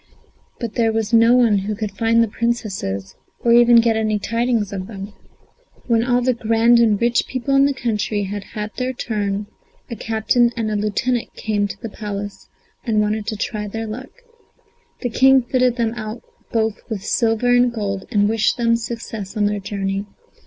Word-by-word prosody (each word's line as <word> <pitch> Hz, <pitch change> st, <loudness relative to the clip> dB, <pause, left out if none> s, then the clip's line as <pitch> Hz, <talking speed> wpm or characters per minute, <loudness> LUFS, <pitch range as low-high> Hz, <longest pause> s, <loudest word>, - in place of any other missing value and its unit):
But 235 Hz, -3 st, -4 dB
there 225 Hz, -2 st, +2 dB
was 220 Hz, 0 st, -2 dB
no 230 Hz, +1 st, +6 dB
one 230 Hz, -5 st, +4 dB
who 205 Hz, +2 st, -3 dB
could 210 Hz, -1 st, -4 dB
find 225 Hz, +3 st, +2 dB
the -, -, 0 dB
Princesses, 205 Hz, -, -3 dB, 0.3 s
or 235 Hz, -, +3 dB
even 240 Hz, 0 st, +6 dB
get 230 Hz, -1 st, +2 dB
any 215 Hz, -1 st, +1 dB
tidings 230 Hz, -1 st, -1 dB
of 190 Hz, -1 st, -5 dB
them. 200 Hz, -1 st, -8 dB, 0.7 s
When 230 Hz, -2 st, +2 dB
all 245 Hz, 0 st, +1 dB
the 255 Hz, 0 st, +2 dB
grand 230 Hz, +1 st, +3 dB
and 220 Hz, -3 st, +3 dB
rich 235 Hz, +1 st, +1 dB
people 260 Hz, +1 st, -2 dB
in 275 Hz, 0 st, +6 dB
the 280 Hz, -, +2 dB
country 215 Hz, -4 st, -1 dB
had 200 Hz, +1 st, -4 dB
had 210 Hz, 0 st, -4 dB
their 255 Hz, 0 st, -1 dB
turn, 205 Hz, -4 st, -2 dB, 0.5 s
a -, -, -3 dB
captain 225 Hz, +3 st, +1 dB
and 220 Hz, -2 st, -1 dB
a -, -, -1 dB
lieutenant 215 Hz, +4 st, -1 dB
came 205 Hz, -2 st, -1 dB
to -, -, -8 dB
the 230 Hz, -, -5 dB
Palace, 205 Hz, -2 st, -6 dB, 0.3 s
and 220 Hz, -3 st, +1 dB
wanted 210 Hz, 0 st, 0 dB
to 225 Hz, -, -2 dB
try 210 Hz, 0 st, -3 dB
their 225 Hz, +2 st, -4 dB
luck. 235 Hz, +5 st, -7 dB, 0.9 s
The 245 Hz, -, -1 dB
King 265 Hz, +2 st, +5 dB
fitted 250 Hz, 0 st, +1 dB
them 230 Hz, -2 st, 0 dB
out 220 Hz, 0 st, -6 dB, 0.3 s
both 220 Hz, -1 st, 0 dB
with 210 Hz, -4 st, -4 dB
silver 230 Hz, +1 st, +2 dB
and 245 Hz, 0 st, +4 dB
gold, 200 Hz, -4 st, -3 dB
and 205 Hz, -1 st, +3 dB
wished 220 Hz, 0 st, +1 dB
them 230 Hz, -1 st, +2 dB
success 225 Hz, -3 st, -6 dB
on 210 Hz, -, +2 dB
their 205 Hz, 0 st, 0 dB
journey. 195 Hz, 0 st, -3 dB
225 Hz, 185 wpm, -20 LUFS, 205-235 Hz, 0.9 s, no